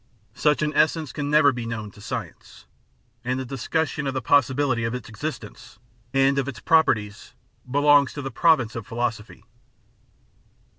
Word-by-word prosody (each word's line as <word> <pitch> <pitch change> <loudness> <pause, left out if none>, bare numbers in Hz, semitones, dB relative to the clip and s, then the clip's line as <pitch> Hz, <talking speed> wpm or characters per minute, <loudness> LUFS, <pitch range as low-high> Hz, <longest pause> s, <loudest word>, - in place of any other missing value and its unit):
Such 150 0 +1
an 150 0 -1
essence 155 -3 +1
can 145 -1 -3
never 150 -1 +5
be 120 -2 -5
known 110 -3 -5
to 100 - -16
science, 115 -6 -7 0.6
and 125 +1 -2
the 130 - -4
discussion 140 +3 -2
of 135 - -3
the - - 0
possibility 130 -2 +2
of 115 +2 -2
its 125 - -7
existence 120 -1 -7 0.3
and 135 +1 +3
of 135 - -2
its 125 -7 -6
properties 105 -7 +1 0.3
belongs 145 +1 +4
to 145 - -6
the 135 - -5
province 130 -5 +2
of 115 -3 -6
philosophy. 115 -3 -4
130 Hz, 155 wpm, -24 LUFS, 115-145 Hz, 0.6 s, never